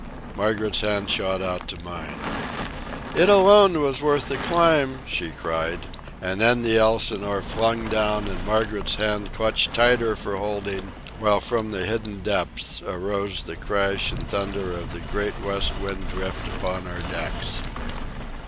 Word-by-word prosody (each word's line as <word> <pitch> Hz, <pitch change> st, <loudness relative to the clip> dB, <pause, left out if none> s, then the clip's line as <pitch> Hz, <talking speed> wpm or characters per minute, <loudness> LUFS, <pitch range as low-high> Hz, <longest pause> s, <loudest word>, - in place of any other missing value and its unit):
Margaret's 105 Hz, 0 st, +1 dB
hand 105 Hz, -1 st, 0 dB
shot 95 Hz, 0 st, +1 dB
out 90 Hz, -1 st, -4 dB
to 85 Hz, -2 st, -7 dB
mine. 85 Hz, -4 st, -8 dB, 1.0 s
"It 175 Hz, +4 st, +6 dB
alone 200 Hz, -3 st, +8 dB
was 140 Hz, -2 st, 0 dB
worth 145 Hz, -2 st, +2 dB
the 135 Hz, -, -1 dB
climb!" 155 Hz, -3 st, +3 dB
she 85 Hz, -, -2 dB
cried. 80 Hz, +2 st, -3 dB, 0.5 s
And 95 Hz, +3 st, -2 dB
then 120 Hz, +1 st, +5 dB
the 115 Hz, -1 st, +4 dB
Elsinore 100 Hz, -3 st, +2 dB
flung 115 Hz, 0 st, 0 dB
down, 105 Hz, -1 st, +1 dB
and 90 Hz, -2 st, -7 dB
Margaret's 105 Hz, 0 st, 0 dB
hand 105 Hz, -2 st, -1 dB
clutched 110 Hz, 0 st, +1 dB
tighter 120 Hz, -2 st, +4 dB
for 100 Hz, -, -5 dB
holding, 100 Hz, -1 st, -4 dB, 0.3 s
while 105 Hz, -2 st, +3 dB
from 110 Hz, +1 st, -2 dB
the 95 Hz, -3 st, -3 dB
hidden 110 Hz, -2 st, -3 dB
depths -, -, -2 dB
arose 100 Hz, +1 st, -3 dB
the -, -, -8 dB
crash 100 Hz, -1 st, 0 dB
and -, -, -7 dB
thunder 100 Hz, -2 st, -3 dB
of 85 Hz, -1 st, -7 dB
the 85 Hz, -, -8 dB
great 105 Hz, +6 st, -3 dB
west 100 Hz, 0 st, 0 dB
wind 100 Hz, -1 st, -5 dB
drift 95 Hz, +1 st, -5 dB
upon 90 Hz, 0 st, -4 dB
our 90 Hz, 0 st, -6 dB
decks. 80 Hz, -4 st, -4 dB
105 Hz, 150 wpm, -24 LUFS, 95-115 Hz, 1.0 s, alone